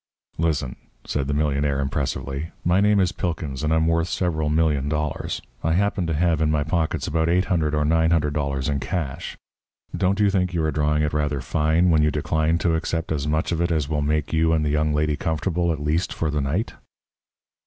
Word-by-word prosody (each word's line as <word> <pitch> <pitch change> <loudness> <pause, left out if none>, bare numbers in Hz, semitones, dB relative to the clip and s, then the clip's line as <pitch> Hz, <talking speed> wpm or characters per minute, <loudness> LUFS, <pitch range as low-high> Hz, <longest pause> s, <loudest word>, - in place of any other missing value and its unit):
"Listen," 75 -6 -1 0.3
said 70 -2 -2
the 70 - -1
millionaire, 70 -1 +1
impressively. 70 +2 -3 0.2
"My 90 +3 +3
name 105 0 +4
is 90 -2 +2
Pilkins, 80 -6 -3
and 75 0 0
I'm 80 0 +3
worth 85 0 +1
several 80 -5 -1
million 75 -3 +1
dollars. 75 -1 -3 0.2
I 80 - +2
happen 95 -1 +1
to 80 - -1
have 85 -1 +1
in 80 - +2
my 75 -1 +1
pockets 80 +1 -1
about 80 -1 0
$800 85 -3 +1
or 75 0 +1
$900 75 -4 +1
in 70 -2 0
cash. 75 -3 -4 0.6
Don't 95 +2 +1
you 105 -1 +4
think 90 -2 0
you 80 - +1
are 80 - +1
drawing 75 0 +1
it 75 - -1
rather 75 -2 0
fine 80 +6 +2
when 80 -2 +4
you 75 - +3
decline 80 +2 0
to 85 - +3
accept 80 0 -2
as 75 -2 -1
much 80 +2 0
of 85 0 0
it 85 - +1
as 75 -4 0
will 75 -2 0
make 75 +1 -1
you 80 +1 +3
and 80 -1 +1
the - - +1
young 75 +1 +1
lady 75 0 +1
comfortable 85 +3 -1
at 80 - -3
least 75 +5 0
for 80 -2 -2
the 75 -1 0
night?" 80 +11 -2
80 Hz, 205 wpm, -23 LUFS, 75-85 Hz, 0.6 s, name